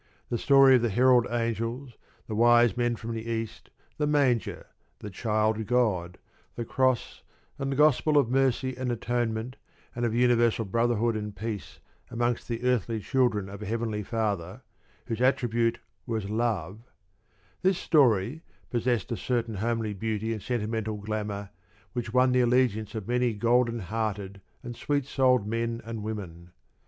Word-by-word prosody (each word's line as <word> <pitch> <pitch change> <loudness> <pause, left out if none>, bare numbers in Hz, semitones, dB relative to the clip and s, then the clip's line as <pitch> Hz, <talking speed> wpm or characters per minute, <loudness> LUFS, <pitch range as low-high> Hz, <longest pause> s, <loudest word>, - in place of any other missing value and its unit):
The 120 - +1
story 135 -2 +6
of - - -1
the 120 - +1
herald 125 +2 +4
angels, 115 +2 -2 0.3
the 110 - -6
wise 120 -1 +5
men 120 -1 0
from 115 +1 -6
the 110 -1 -4
east, 115 -1 -4 0.3
the 150 - +1
manger, 135 -8 +1 0.3
the 105 - -8
child 110 +2 0
God, 105 -8 +1 0.4
the 120 - -4
cross, 130 - 0 0.4
and 135 0 -2
the - - -1
gospel 150 +1 +4
of 140 - +4
mercy 130 0 +1
and 130 -1 -2
atonement, 120 0 -2 0.4
and 120 - -3
of 115 -1 0
universal 120 -2 +3
brotherhood 115 +2 +1
and 105 -1 -5
peace 105 0 -5 0.3
amongst 120 0 -1
the 115 0 -4
earthly 120 -3 +1
children 115 -4 +1
of 100 +1 -9
a 105 - -5
Heavenly 110 -1 -2
Father, 100 -5 -3 0.4
whose 115 +1 -4
attribute 120 -3 +2 0.3
was 110 -4 -3
love 110 -4 -1 0.8
this 190 0 +2
story, 130 - +2 0.3
possessed 120 -3 0
a - - 0
certain 120 -3 -1
homely 110 0 -1
beauty 110 +2 -2
and 110 - -6
sentimental 110 -2 -2
glamour 105 -1 -4 0.4
which 120 -3 -3
won 125 +1 +4
the 125 0 +3
allegiance 120 -3 +1
of 110 -2 -5
many 125 -1 +1
golden 120 +2 +2
hearted 100 -1 -4 0.2
and 120 -1 -6
sweet 145 +2 -1
souled 130 -5 +2
men 115 +1 -2
and 115 -1 -5
women. 95 -6 -6
115 Hz, 150 wpm, -27 LUFS, 110-125 Hz, 0.8 s, story